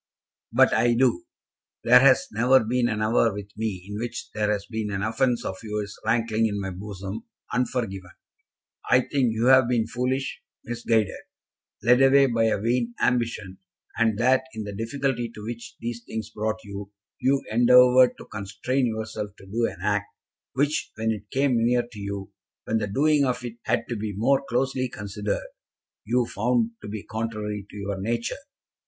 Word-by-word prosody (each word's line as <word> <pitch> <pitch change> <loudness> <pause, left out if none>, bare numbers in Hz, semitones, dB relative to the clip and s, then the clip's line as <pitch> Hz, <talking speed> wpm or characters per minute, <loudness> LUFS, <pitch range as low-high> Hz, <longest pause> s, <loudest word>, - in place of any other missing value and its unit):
"But - - +5
I 120 +1 +3
do. 120 -7 +2 0.6
There 125 +2 +8
has 130 -1 +5
never 125 +3 +4
been 120 +2 +1
an 110 -1 -1
hour 115 +1 +3
with 100 0 -8
me 105 -4 -3
in 105 +1 -5
which 120 0 -5
there 105 -1 0
has 100 -1 -2
been 110 -2 -3
an 100 -1 -2
offence 120 +2 0
of 95 - -4
yours 105 -2 -4
rankling 115 0 +1
in 100 -1 -3
my 95 -1 -3
bosom 100 +2 -7 0.3
unforgiven. 115 -7 -2 0.8
I 125 - +6
think 130 -2 0
you 110 +1 -1
have 130 -2 +7
been 120 -3 +2
foolish, 125 +3 -2 0.2
misguided, 115 -3 0 0.7
led 125 +3 +5
away 135 +1 +6
by 115 -3 +1
a 110 -2 +1
vain 120 +2 0
ambition, 115 -6 -1 0.4
and 115 -2 +2
that 130 +3 +3
in 110 - -4
the 100 -1 -6
difficulty 120 +2 -2
to 105 - -9
which 115 +1 -7
these 120 0 -5
things 110 -1 -6
brought 110 +1 -2
you, 100 -1 -8 0.3
you 135 +2 +2
endeavoured 125 +2 +6
to - - -11
constrain 110 +6 -2
yourself 110 -2 -4
to - - -14
do 115 +4 0
an 90 - -9
act, 105 0 0 0.5
which, 145 +3 0
when 110 0 0
it 105 -1 -6
came 130 -4 +2
near 120 +1 +3
to 120 -3 -12
you, 100 -1 -5 0.3
when 110 - 0
the 105 - -2
doing 145 +7 +3
of 125 -2 -1
it 120 -1 -7
had 115 - 0
to 120 - -2
be 105 -1 -4
more 135 +6 +2
closely 130 +1 0
considered, 105 0 -4 0.6
you 120 +2 +2
found 115 +1 0
to - - -8
be 105 0 -5
contrary 110 -2 -4
to - - -11
your 100 -1 -4
nature." 115 +3 -1
115 Hz, 175 wpm, -25 LUFS, 105-125 Hz, 0.8 s, There